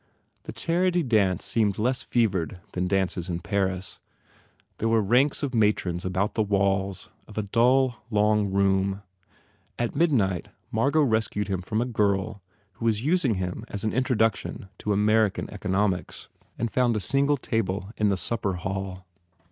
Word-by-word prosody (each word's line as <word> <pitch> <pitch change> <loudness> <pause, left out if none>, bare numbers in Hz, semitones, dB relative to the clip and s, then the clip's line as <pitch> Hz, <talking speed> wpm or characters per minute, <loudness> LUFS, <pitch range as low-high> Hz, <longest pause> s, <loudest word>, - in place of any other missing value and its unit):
The - - -5
charity 175 +1 +1
dance 105 - +2
seemed 105 -4 +1
less 125 +4 0
fevered 95 -7 0
than 90 0 -1
dances 95 -2 -1
in 85 -1 -2
Paris. 95 -2 -1 0.8
There 115 - +1
were 115 0 +4
ranks 125 +9 +2
of 135 -2 -2
matrons 105 -6 +1
about 95 +3 -1
the 110 - 0
walls 100 -2 0 0.2
of 105 - -13
a 110 - 0
dull, 120 +4 +3
long 105 -2 +2
room. 95 0 +1 0.7
At 120 +1 -2
mid 165 +2 +3
night 95 - +1 0.3
M 110 - 0
argot 145 +4 +3
rescued 110 -2 0
him 95 -2 -1
from 105 +5 -1
a - - 0
girl 105 -3 0 0.3
who 115 - -7
was 110 -1 +1
using 150 - +2
him 90 -1 -4
as 100 - -5
an 110 - -1
introduction 115 -6 0
to 105 - -2
American 105 0 +2
eco - - -6
nomics 95 -1 -1 0.3
and 115 -1 -2
found 125 -3 +2
a - - 0
single 140 +7 +3
table 100 -5 -2
in 105 -1 +2
the 100 - +1
supper 100 -1 -1
hall. 95 0 -5
105 Hz, 165 wpm, -26 LUFS, 95-115 Hz, 0.8 s, were